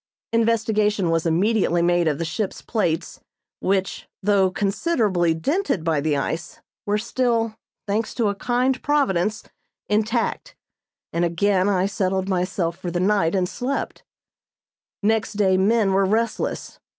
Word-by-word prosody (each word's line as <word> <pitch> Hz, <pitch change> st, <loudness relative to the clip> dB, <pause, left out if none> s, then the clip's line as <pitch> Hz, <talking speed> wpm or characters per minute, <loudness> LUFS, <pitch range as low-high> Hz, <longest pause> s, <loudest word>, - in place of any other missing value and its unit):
Investigation 215 Hz, -4 st, +2 dB
was 165 Hz, 0 st, +1 dB
immediately 175 Hz, 0 st, +2 dB
made 175 Hz, -1 st, +2 dB
of 150 Hz, -3 st, +1 dB
the 165 Hz, -, -2 dB
ship's 195 Hz, +5 st, -3 dB
plates, 175 Hz, -8 st, -1 dB, 0.4 s
which, 190 Hz, 0 st, -1 dB, 0.2 s
though 195 Hz, -2 st, +3 dB
considerably 195 Hz, -, +1 dB
dented 280 Hz, -, -1 dB
by 160 Hz, -3 st, +1 dB
the 150 Hz, -1 st, +1 dB
ice, 160 Hz, +4 st, -4 dB, 0.3 s
were 205 Hz, +1 st, +2 dB
still, 230 Hz, -1 st, 0 dB, 0.3 s
thanks 215 Hz, +2 st, -2 dB
to 230 Hz, -4 st, +1 dB
a 200 Hz, -, +1 dB
kind 250 Hz, +5 st, 0 dB
Providence, 215 Hz, -9 st, +1 dB, 0.5 s
intact; 220 Hz, +3 st, -1 dB, 0.6 s
and 170 Hz, -, +1 dB
again 185 Hz, +3 st, +2 dB
I 190 Hz, -2 st, +2 dB
settled 190 Hz, -1 st, -1 dB
myself 180 Hz, -2 st, -1 dB
for 180 Hz, -, -4 dB
the 175 Hz, +1 st, -2 dB
night 190 Hz, -2 st, +2 dB
and 185 Hz, -2 st, +1 dB
slept. 260 Hz, +8 st, -4 dB, 1.0 s
Next 220 Hz, +1 st, +1 dB
day 200 Hz, -2 st, +2 dB
men 200 Hz, +1 st, +3 dB
were 195 Hz, 0 st, +3 dB
restless. 225 Hz, +3 st, -2 dB
200 Hz, 135 wpm, -23 LUFS, 175-220 Hz, 1.0 s, though